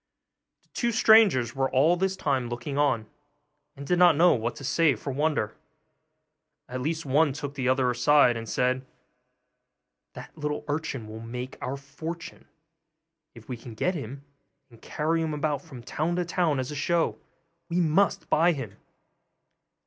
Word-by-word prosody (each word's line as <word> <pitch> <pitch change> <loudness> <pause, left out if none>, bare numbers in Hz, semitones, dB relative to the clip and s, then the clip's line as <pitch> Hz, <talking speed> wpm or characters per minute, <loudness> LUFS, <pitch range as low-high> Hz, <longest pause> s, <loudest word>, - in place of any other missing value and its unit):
The - - -35
two 235 -1 -1
strangers 215 - +5
were 135 0 0
all 150 +7 +4
this 190 +1 0
time 135 -8 -1
looking 125 +4 -5
on, 135 -6 +1 0.7
and 140 0 -9
did 180 +4 +1
not 175 -3 +7
know 175 +2 +6
what 115 0 -2
to - - -10
say 150 +2 +3
for 140 - -5
wonder. 145 -6 -1 1.1
At 125 0 -5
last 160 +2 -2
one 145 +2 +3
took 145 0 -6
the 130 -3 -1
other 130 -1 +2
aside, 125 0 +4
and 115 -1 -6
said, 125 +1 0 1.3
'That - - -11
little 150 -1 -4
urchin 145 -5 -3
will 110 +1 -8
make 125 +3 -6
our 135 +2 -3
fortune, 160 +5 -8 0.9
if 115 -1 -14
we 125 - -4
can 115 -1 -11
get 180 +11 0
him, 140 -2 -7 0.5
and 115 - -18
carry 160 +2 -1
him 155 -2 -2
about 150 -2 -1
from 125 -5 -12
town 160 +8 -2
to 180 0 -1
town 170 -5 0
as 130 +2 -3
a - - -5
show; 165 +3 0 0.5
we 170 +1 0
must 175 +4 +2
buy 170 +2 +3
him. 115 -9 -7
145 Hz, 165 wpm, -27 LUFS, 125-165 Hz, 1.3 s, not